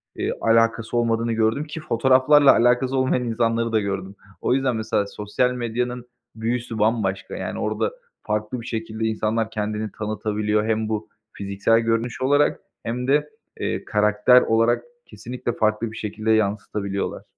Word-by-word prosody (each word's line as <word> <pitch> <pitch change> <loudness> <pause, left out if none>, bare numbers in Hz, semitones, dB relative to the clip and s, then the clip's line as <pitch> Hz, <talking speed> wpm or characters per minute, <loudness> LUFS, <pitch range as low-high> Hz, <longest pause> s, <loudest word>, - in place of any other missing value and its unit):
iii, - - -2
alakası 115 0 +2
olmadığını 115 0 +1
gördüm 110 +5 +1
ki 150 +1 -7
fotoğraflarla 130 +3 +5
alakası 125 +3 +2
olmayan 130 -1 +1
insanları 115 0 0
da 110 - +3
gördüm. 100 -1 -4 0.3
O - - +1
yüzden 130 -2 +1
mesela 110 -2 -1
sosyal 105 +5 -1
medyanın 125 0 -3 0.3
büyüsü 115 0 -3
bambaşka, 105 -3 0
yani - - -4
orada - - -1 0.3
farklı 105 +3 -2
bir - - -11
şekilde 110 -1 -3
insanlar 110 0 0
kendini 105 0 -3
tanıtabiliyor. 105 0 -1
Hem 110 -1 0
bu 110 -1 -3 0.2
fiziksel 100 +3 +1
görünüş 115 +2 -1
olarak 145 +3 +3 0.2
hem 125 +2 -3
de, 150 +2 +2 0.3
eee, - - -2
karakter 105 +4 +4
olarak 115 +1 +2 0.2
kesinlikle 120 -1 -5
farklı 110 0 0
bir 110 - -9
şekilde 110 +1 -2
yansıtabiliyorlar. 100 -2 -1
115 Hz, 140 wpm, -23 LUFS, 110-120 Hz, 0.3 s, fotoğraflarla